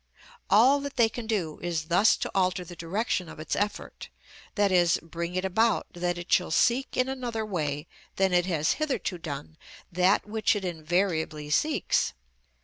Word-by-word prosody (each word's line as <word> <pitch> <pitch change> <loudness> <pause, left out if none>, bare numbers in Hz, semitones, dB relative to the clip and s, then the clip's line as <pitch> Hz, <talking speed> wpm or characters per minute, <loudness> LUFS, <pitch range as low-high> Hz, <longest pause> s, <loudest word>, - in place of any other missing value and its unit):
All 255 +8 +6
that 280 -1 -6
they 235 -3 +4
can 225 0 -7
do 180 -9 -2
is 170 -3 -2
thus 180 +7 +4
to - - -4
alter 185 -1 +1
the 175 - -10
direction 180 +1 -2
of - - -11
its 155 - -3
effort, 205 +1 -4 0.5
i.e., 185 -4 +4 0.2
bring 170 +2 -5
it 185 +1 -1
about 220 +3 +1
that 175 0 -2
it 175 0 -8
shall 180 - +3
seek 245 +10 +1
in 255 - +2
another 245 -4 -3
way 150 -7 -2 0.3
than 190 -1 +2
it 175 0 +3
has 155 -4 +1
hitherto 265 - -2
done 155 -1 -7 0.3
that 180 +3 +3
which 215 +1 +1
it 200 -2 -3
invariably 160 -3 -1
seeks. 285 - +1
180 Hz, 165 wpm, -27 LUFS, 165-220 Hz, 0.5 s, All